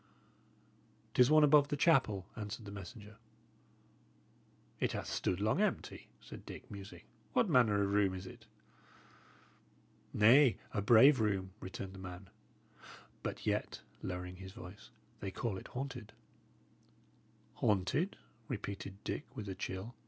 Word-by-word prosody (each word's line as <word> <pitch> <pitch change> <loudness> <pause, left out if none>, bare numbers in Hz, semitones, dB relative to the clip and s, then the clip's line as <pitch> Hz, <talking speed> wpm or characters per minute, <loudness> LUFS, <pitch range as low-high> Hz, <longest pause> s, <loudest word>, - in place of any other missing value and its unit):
"'Tis 125 +1 +5
one 155 0 +7
above 145 -1 +6
the 145 - -2
chapel," 130 - +3
answered 105 +1 -6
the 100 - -7
messenger. 105 +2 -9 1.6
"It - - 0
hath - - -3
stood 90 - -1
long 110 - +2
empty," 210 -2 -2
said - - -11
Dick, - - -10
musing. 100 -1 -9 0.3
"What - - +3
manner 105 -5 +4
of 100 - 0
room 100 -2 +3
is 95 0 -7
it?" - - -12 1.6
"Nay, 120 +4 +6 0.2
a 100 - 0
brave 120 +6 +7
room," 100 -3 0
returned 95 -1 -6
the 95 - -10
man. 90 +1 -9 0.9
"But - - -5
yet" - - -1 0.2
lowering 90 0 -5
his 95 0 -9
voice 105 -3 -11 0.3
"they 100 - -4
call 105 +2 -3
it - - -11
haunted." 125 -4 -6 1.4
"Haunted?" 105 - +1 0.3
repeated 100 -3 -6
Dick, - - -3
with 105 - -5
a 95 - -3
chill. 95 +4 -5
105 Hz, 130 wpm, -35 LUFS, 95-125 Hz, 1.6 s, one